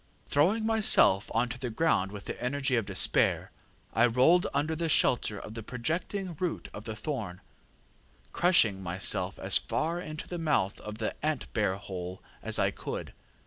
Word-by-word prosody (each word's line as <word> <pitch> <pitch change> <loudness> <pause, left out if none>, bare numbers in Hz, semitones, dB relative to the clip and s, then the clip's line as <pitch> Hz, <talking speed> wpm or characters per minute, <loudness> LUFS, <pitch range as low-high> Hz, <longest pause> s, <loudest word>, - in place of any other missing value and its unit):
ŌĆ£Throwing 185 +10 +3
myself 215 - +4
on 115 +2 +1
to 125 +1 -7
the 125 - -3
ground 110 - +1
with 100 -1 -9
the - - -6
energy 135 0 0
of 115 -4 -1
despair, 95 -2 +2 0.4
I 115 +3 +4
rolled 130 +10 +4
under 150 +3 -1
the 165 0 -2
shelter 120 -7 +2
of 105 +2 -9
the 115 - -6
projecting 165 - -3
root 180 -2 -3
of 105 - -9
the 110 - -5
thorn, 110 - -5 0.9
crushing 115 - +3
myself 95 +1 +1
as - - +4
far 170 +3 -2
into 155 -2 -7
the 175 - -5
mouth 150 -12 0
of 105 0 -8
the 110 -1 -2
ant 155 -3 -2
bear 105 -4 +1
hole 95 -2 -7 0.2
as - - +2
I - - +2
could. - - -6
125 Hz, 170 wpm, -29 LUFS, 100-160 Hz, 0.9 s, myself